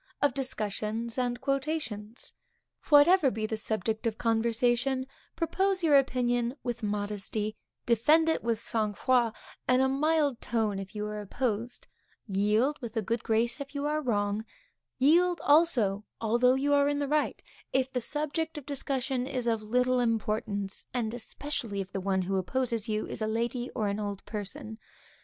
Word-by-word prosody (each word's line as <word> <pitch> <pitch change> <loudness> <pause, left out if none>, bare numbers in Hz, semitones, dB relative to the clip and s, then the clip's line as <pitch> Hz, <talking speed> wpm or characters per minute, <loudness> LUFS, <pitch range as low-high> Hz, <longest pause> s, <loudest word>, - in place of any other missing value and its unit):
Of 285 -3 +2
Discussions 225 -3 -2
and 245 -1 -1
Quotations. 270 -6 -3 0.6
Whatever 300 +1 +7
be 215 -1 -3
the 220 - -2
subject 220 +1 -1
of 220 -1 -2
conversation, 240 +3 +1 0.3
propose 375 +3 0
your 305 -3 +5
opinion 245 -2 +2
with 240 -1 -3
modesty; 210 +1 -2 0.3
defend 295 +8 +4
it 320 - +1
with 230 -1 +1
sangfroid 225 +2 +1 0.3
and 255 0 +4
a - - +4
mild 290 -1 +1
tone 215 -4 0
if 195 +2 -8
you 210 0 -2
are 210 0 -4
opposed; 235 +2 -3 0.4
yield 210 +8 +2
with 235 -1 -6
a 220 - +1
good 230 +3 -2
grace 235 +4 +1
if 280 +1 -8
you 285 0 -2
are 305 +1 0
wrong; 205 -4 0 0.5
yield 340 +6 +4
also, 255 - +3 0.2
although 240 +3 +3
you 285 +2 +1
are 285 0 +4
in 290 - 0
the 285 -1 -1
right, 300 +1 0 0.3
if 265 0 0
the 250 - 0
subject 305 +5 -2
of 290 - -7
discussion 265 -2 -2
is 255 -3 -2
of 225 -2 +1
little 250 +3 +2
importance, 215 -4 -1
and 225 -2 -1
especially 240 -3 -4
if 195 0 -5
the 195 - -3
one 190 0 +1
who 190 +2 -1
opposes 230 +2 -1
you 215 0 -1
is - - -5
a 215 - 0
lady, 235 +3 -1
or 215 - 0
an 200 +1 -1
old 205 -2 -4
person. 215 +1 -6
235 Hz, 160 wpm, -29 LUFS, 215-275 Hz, 0.6 s, Whatever